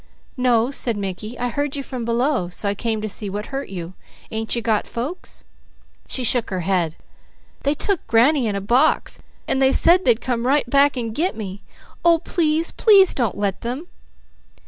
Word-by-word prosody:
"No," 250 -1 +2
said 235 -5 -1
Mickey. 205 +4 -5
"I 245 0 -2
heard 285 +3 -2
you 280 - -4
from 255 -3 -6
below 235 -4 0
so 180 +3 -4
I 200 - +1
came 220 +1 -2
to - - -1
see 205 0 -4
what 205 +2 -4
hurt 275 +1 -4
you. 180 -2 -7 0.4
Ain't 220 +1 -1
you 235 - -1
got 220 -2 0
folks?" 260 +10 -6 0.6
She 255 - -2
shook 240 0 +1
her 185 -2 -3
head: 170 -3 0 0.7
"They 285 +2 0
took 390 +4 -1
granny 240 +3 +3
in 205 - -1
a 200 - -2
box 245 +10 +2 0.3
and 265 - +1
they 265 0 +5
said 355 +6 +4
they'd 235 -2 +3
come 245 -1 -2
right 280 -1 +2
back 280 +1 +3
and 230 -3 -3
'get' 335 +5 -1
me. 200 -2 -6 0.4
Oh, 340 -1 +5
please, 320 0 0
please 395 -4 +5
don't 235 -7 -1
let 200 -2 -2
them!" 255 +9 -5
240 Hz, 190 wpm, -21 LUFS, 210-280 Hz, 0.7 s, they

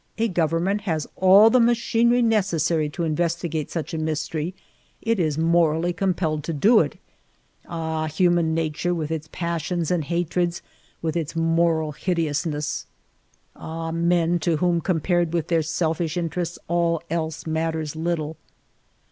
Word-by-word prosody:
A 225 +1 +2
government 175 +2 0
has 155 -3 0
all 195 +4 +7
the 255 - +5
machinery 235 +1 +3
necessary 170 -8 +1
to 170 - -4
investigate 165 -1 -1
such 160 -2 -4
a 160 - -2
mystery; 155 +2 -2 0.4
it 230 -2 0
is 155 -4 0
morally 165 +1 +2
com 190 0 0
pelled 155 -4 -1
to 165 - -2
do 215 - +5
it. - - -1 0.7
Ahj 160 -2 -3
human 170 -1 +2
nature 165 +2 -1
with 160 -2 -3
its 160 -1 -4
passions 170 -1 -2
and 175 -3 +1
hatreds, 175 +1 -1 0.4
with 160 0 -1
its 165 -1 -3
moral 165 -1 +2
hideousness! 155 -2 -2 0.7
Ah, 165 0 -5
men, 170 +1 +2
to 165 -1 +1
whom, 175 +1 +1
compared 175 0 0
with 170 -3 -1
their 165 -2 +3
selfish 160 +1 -1
interests, 175 0 -2
all 170 -1 +1
else 160 -1 -3
matters 160 -1 -2
little 160 -1 -2
165 Hz, 140 wpm, -23 LUFS, 160-175 Hz, 0.7 s, all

